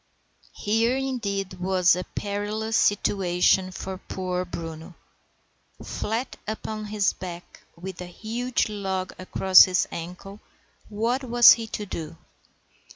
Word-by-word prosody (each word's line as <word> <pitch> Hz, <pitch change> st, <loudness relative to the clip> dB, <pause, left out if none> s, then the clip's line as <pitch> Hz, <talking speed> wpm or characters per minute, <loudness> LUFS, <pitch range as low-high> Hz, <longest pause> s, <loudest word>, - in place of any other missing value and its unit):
Here, 225 Hz, +4 st, +1 dB
indeed, 200 Hz, -9 st, -3 dB
was 185 Hz, -1 st, +3 dB
a 180 Hz, -, -3 dB
perilous 210 Hz, +2 st, -3 dB
situation 190 Hz, -3 st, +2 dB
for 185 Hz, +1 st, -6 dB
poor 185 Hz, -1 st, -3 dB
Bruno. 165 Hz, 0 st, -8 dB, 0.9 s
Flat 225 Hz, +5 st, -3 dB
upon 215 Hz, 0 st, -4 dB
his 210 Hz, -2 st, +1 dB
back, 175 Hz, -1 st, -9 dB
with 180 Hz, +1 st, -8 dB
a 180 Hz, -, -6 dB
huge 230 Hz, +7 st, -2 dB
log 190 Hz, -3 st, -3 dB
across 185 Hz, 0 st, +6 dB
his 185 Hz, -1 st, +1 dB
ankle, 180 Hz, +4 st, -8 dB, 0.5 s
what 230 Hz, +5 st, -1 dB
was 240 Hz, -1 st, +8 dB
he 230 Hz, -1 st, +2 dB
to 210 Hz, -1 st, -5 dB
do? 165 Hz, -4 st, -6 dB
195 Hz, 115 wpm, -25 LUFS, 180-220 Hz, 0.9 s, was